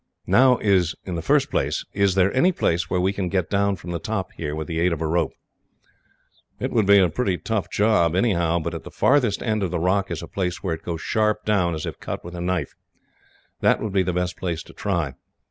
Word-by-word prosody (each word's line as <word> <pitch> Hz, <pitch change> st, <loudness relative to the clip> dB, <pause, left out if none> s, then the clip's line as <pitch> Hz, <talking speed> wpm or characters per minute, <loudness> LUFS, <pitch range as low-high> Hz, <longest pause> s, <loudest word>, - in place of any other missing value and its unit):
"Now, 130 Hz, -1 st, +5 dB
in 100 Hz, -4 st, +3 dB, 0.3 s
the 85 Hz, -, -2 dB
first -, -, +2 dB
place, -, -, -1 dB
is 100 Hz, -2 st, +2 dB
there 95 Hz, 0 st, +3 dB
any 175 Hz, +9 st, +4 dB
place 85 Hz, -, 0 dB
where 90 Hz, -, 0 dB
we 95 Hz, +2 st, +1 dB
can 95 Hz, -3 st, -2 dB
get 90 Hz, -2 st, -1 dB
down 100 Hz, 0 st, +2 dB
from 85 Hz, -1 st, -8 dB
the 85 Hz, -, -2 dB
top 95 Hz, +1 st, -3 dB
here, 75 Hz, -2 st, -5 dB
with 80 Hz, 0 st, -4 dB
the 80 Hz, +2 st, -3 dB
aid 85 Hz, +1 st, +2 dB
of 80 Hz, -, -4 dB
a 80 Hz, -, -2 dB
rope?" 80 Hz, -1 st, 0 dB, 1.3 s
"It -, -, -2 dB
would 110 Hz, -4 st, +2 dB
be 100 Hz, 0 st, +7 dB
a 95 Hz, -2 st, +5 dB
pretty 90 Hz, +3 st, -1 dB
tough 110 Hz, +1 st, -2 dB
job, 100 Hz, -6 st, +2 dB
anyhow, 85 Hz, -5 st, +2 dB
but 85 Hz, 0 st, -3 dB
at -, -, -6 dB
the -, -, -9 dB
farthest 130 Hz, -7 st, +2 dB
end 110 Hz, -2 st, 0 dB
of 95 Hz, -, 0 dB
the 90 Hz, -, -2 dB
rock 95 Hz, +3 st, +1 dB
is 85 Hz, -1 st, -4 dB
a -, -, -7 dB
place 90 Hz, -2 st, -3 dB
where 90 Hz, -4 st, -1 dB
it 80 Hz, -, -6 dB
goes 85 Hz, -2 st, -5 dB
sharp 105 Hz, -1 st, 0 dB
down, 90 Hz, -6 st, +1 dB
as 80 Hz, -, -4 dB
if -, -, -6 dB
cut -, -, -6 dB
with 85 Hz, -, -8 dB
a 85 Hz, -, -5 dB
knife. 90 Hz, -5 st, -2 dB, 0.9 s
That -, -, +3 dB
would 105 Hz, -3 st, -4 dB
be 95 Hz, -, +3 dB
the 90 Hz, 0 st, 0 dB
best 90 Hz, 0 st, -2 dB
place 85 Hz, -3 st, -3 dB
to -, -, -15 dB
try. 85 Hz, -9 st, -2 dB
90 Hz, 240 wpm, -23 LUFS, 85-100 Hz, 1.3 s, be